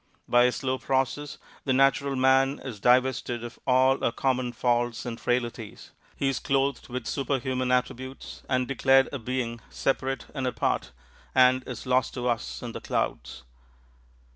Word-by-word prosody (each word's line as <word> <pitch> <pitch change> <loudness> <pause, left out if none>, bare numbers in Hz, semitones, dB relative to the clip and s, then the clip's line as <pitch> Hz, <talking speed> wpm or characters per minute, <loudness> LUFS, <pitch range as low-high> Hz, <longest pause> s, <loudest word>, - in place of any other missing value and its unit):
By 120 0 +5
a 125 - +3
slow 130 +1 -2
process, 135 +2 -1 0.3
the 135 - +1
natural 135 +1 +3
man 135 +1 +3
is 125 -6 -7
divested 125 0 +2
of 120 -1 -8
all 130 +1 +4
our - - +2
common 130 -1 0
faults 120 0 0
and 115 -1 -5
frailties; 120 -3 -3 0.2
he 140 - -1
is 135 -1 0
clothed 135 -1 0
with 125 -1 -4
superhuman 130 -2 -1
attributes 130 +1 -2
and 130 -1 +1
declared 135 0 +4
a 140 - -3
being 120 -1 -3
separate 135 0 -1
and 135 -3 -2
apart, 110 - -1 0.4
and 130 0 +5
is 125 -4 -6
lost 130 0 +1
to 125 0 -2
us 120 0 -2
in 120 - -5
the - - -7
clouds. - - -3
130 Hz, 155 wpm, -27 LUFS, 120-135 Hz, 0.4 s, By